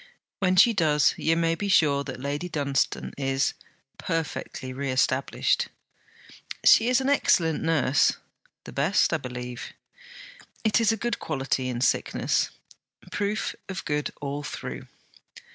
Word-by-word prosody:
'When 185 -2 +2
she 230 +6 +6
does, 155 -6 +3
you 165 +1 +1
may 165 0 +2
be 200 +5 -3
sure 150 -7 +3
that - - -6
Lady 145 +6 -3
Dunstane 140 -4 -1
is, 135 0 0 0.5
perfectly 155 -5 -4
reestablished.' 130 -1 0 1.0
'She 225 - +7
is 255 +1 +3
an 265 - -1
excellent 170 - +2
nurse.' 145 -5 +3 0.5
'The - - -10
best, 160 +7 +2
I - - +3
believe.' 125 -3 -7 0.9
'It 220 +1 +3
is 225 -1 +4
a 225 - -1
good 240 +3 -2
quality 135 -3 -2
in 120 -1 -3
sickness.' - - +1 0.6
'Proof 205 +1 -1 0.2
of 190 0 -5
good 150 -2 -1
all 145 0 -4
through.' - - -7
155 Hz, 130 wpm, -26 LUFS, 135-190 Hz, 1.0 s, She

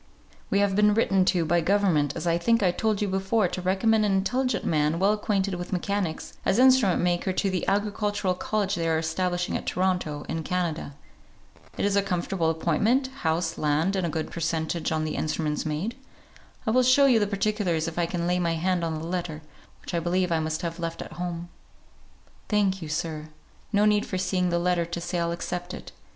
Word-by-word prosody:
"We 200 - +2
have 200 -1 +2
been 210 0 +4
written 195 -4 +3
to 180 -3 +2
by 170 +2 +2
government, 170 -6 +2
as - - -4
I 170 0 +2
think 230 +4 +2
I 180 - +4
told 215 +3 0
you - - 0
before, 195 +2 +1
to 185 - -4
recommend 215 +4 +2
an 205 -2 +2
intelligent 250 +7 0
man, 155 0 +1
well 195 +4 +3
acquainted 200 -2 0
with 175 0 -5
mechanics, 185 -2 -2
as 190 - +2
instrument 255 -8 +5
maker 175 +2 +1
to 190 +1 0
the 185 - -2
Agricultural 205 -1 0
College 200 +2 -1
they 165 -3 0
are 160 - +2
establishing 175 +2 -1
at - - -4
Toronto, 180 -5 -1
in 165 - -3
Canada. 165 -4 -2 0.8
It - - 0
is 200 -1 +1
a 200 - +4
comfortable 180 -3 -1
appointment, 205 - +1
house, 160 +2 -1
land, 155 +6 +1
and 190 - 0
a 170 - 0
good 160 0 -3
per - - -6
centage 160 0 -1
on 155 0 0
the 155 - -3
instruments 155 0 -1
made. 165 +11 -2 0.7
I 220 - +1
will 255 +3 +4
show 255 +3 +5
you 250 -4 +5
the 205 - +1
particulars 200 -5 0
if 165 +1 -4
I 170 - +1
can 170 0 -2
lay 180 +1 +1
my 170 -2 +1
hand 180 +1 0
on 160 -1 -2
the 160 - -6
letter, 170 -3 -4 0.4
which - - -8
I 170 - +1
believe 180 +1 0
I 165 - +2
must 155 +1 -2
have 170 0 -4
left 165 -1 -4
at - - -11
home." 175 -1 -4 1.0
"Thank 195 -3 +1
you, 160 - -6
sir. 155 0 -3 0.4
No 205 0 +3
need 210 -1 +2
for 185 - -3
seeing 185 -1 0
the 170 - +1
letter 175 0 +1
to 170 +1 -5
say 175 +1 -3
I'll 170 0 0
accept 175 +1 -4
it. - - -10
180 Hz, 210 wpm, -26 LUFS, 165-200 Hz, 1.0 s, instrument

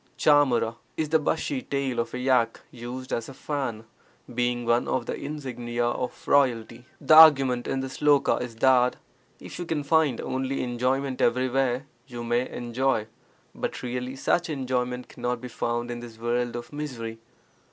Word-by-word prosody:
^H< 130 -6 +3 0.2
is 155 -2 -1
the 160 0 +4
bushy 150 -3 -1
tail 135 -2 -2
of 115 - -2
a - - -2
yak 125 -3 +1
used 125 +1 -7
as 115 +1 -2
a 135 - -10
fan, 130 -6 -4 0.5
being 120 0 0
one 120 +1 +2
of 125 - -1
the - - -3
insignia 120 -5 -4
of 120 +1 -3
royalty. 120 -3 +2
The - - +3
argument 135 -6 +7
in 135 - -1
this 135 -1 -6
sloka 145 -2 +3
is 125 -2 -6
that 125 +1 +4 0.4
if - - -9
you 175 - -3
can 155 -3 -1
find 150 -4 +2
only 130 +1 -2
enjoyment 130 +2 -1
everywhere, 130 +1 +1 0.2
you 120 -2 -7
may 120 +2 0
enjoy, 120 -1 -1 0.5
but - - -4
really 125 +1 -4
such 175 +5 0
enjoyment 125 -3 -2
cannot 125 0 -3
be 125 - -7
found 120 0 -2
in 120 - -5
this 120 -2 -10
world 120 +1 -1
of 120 +4 -7
misery. 120 -7 -5
125 Hz, 165 wpm, -26 LUFS, 120-135 Hz, 0.5 s, argument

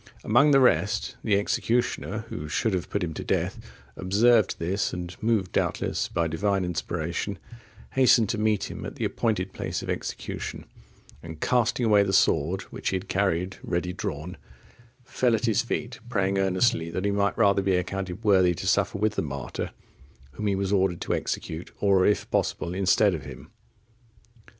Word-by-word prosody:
Among 125 +7 +4
the 135 -2 +6
rest, 130 - +2
the 100 -2 +3
executioner, 115 +4 -1
who 75 - -5
should 105 +7 0
have 90 -1 -2
put 100 - -1
him 80 -2 -3
to - - -6
death, - - -1 0.4
observed 105 +3 +3
this, 95 +5 -1
and 90 -1 -5
moved 110 -5 +1
doubtless - - -1
by 85 - -1
Divine 95 +4 0
inspiration 90 +2 -3 0.5
hastened 125 -4 +5
to 110 - -1
meet 110 -2 0
him - - -7
at - - -6
the - - -2
appointed 100 -5 -1
place - - -4
of - - -3
execution, - - -5 0.6
and 80 -1 -9
casting 120 +2 +1
away 105 -2 +5
the 100 -1 0
sword 85 0 +2
which - - -3
he - - -1
had 95 +1 -5
carried 95 -2 0
ready 90 0 -2
drawn, 90 -4 -5 0.7
fell 120 -1 +1
at 110 +2 -2
his 110 -3 +2
feet, 120 +1 -4
praying 100 -3 +1
earnestly 95 -2 +1
that 90 +4 -3
he 100 - +2
might 100 0 0
rather 100 -3 +4
be 95 -1 +1
accounted 95 +2 -3
worthy 95 -4 +4
to 95 - -6
suffer 100 +2 +1
with 105 +1 +1
the - - -1
martyr, 70 -2 -4 0.6
whom 105 +9 -4
he 100 - +2
was 100 +1 -1
ordered 95 -3 +2
to - - -1
execute, 80 +2 -4
or, 100 -2 +4
if 105 - +1
possible, 85 - -1
instead 95 +2 +3
of 80 -5 -4
him. 65 -3 -10
95 Hz, 175 wpm, -26 LUFS, 90-110 Hz, 0.7 s, the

